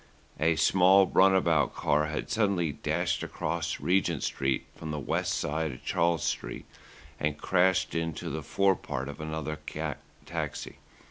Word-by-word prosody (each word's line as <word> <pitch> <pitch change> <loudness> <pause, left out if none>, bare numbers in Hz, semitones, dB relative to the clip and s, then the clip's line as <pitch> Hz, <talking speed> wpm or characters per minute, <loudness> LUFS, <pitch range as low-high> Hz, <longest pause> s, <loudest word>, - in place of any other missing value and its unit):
A 80 +1 +3
small 95 +3 +5
run 95 +1 +5
about 80 -7 +2
car 75 +1 +1
had 75 0 -4
suddenly 100 - +1
dashed - - -1
across - - -3
Regent 90 -4 +1
Street 65 -1 -1
from 80 - -7
the 75 -1 -3
west 70 - -1
side 80 +1 -1
of 65 - -13
Charles 85 -2 +1
Street - - -3 0.5
and 75 -1 -1
crashed 95 +2 +2
into 80 -1 -3
the 80 - -3
forepart 85 -5 0
of 70 +1 -7
another 80 -1 -4 0.7
taxi. - - -5
80 Hz, 140 wpm, -29 LUFS, 75-95 Hz, 0.7 s, small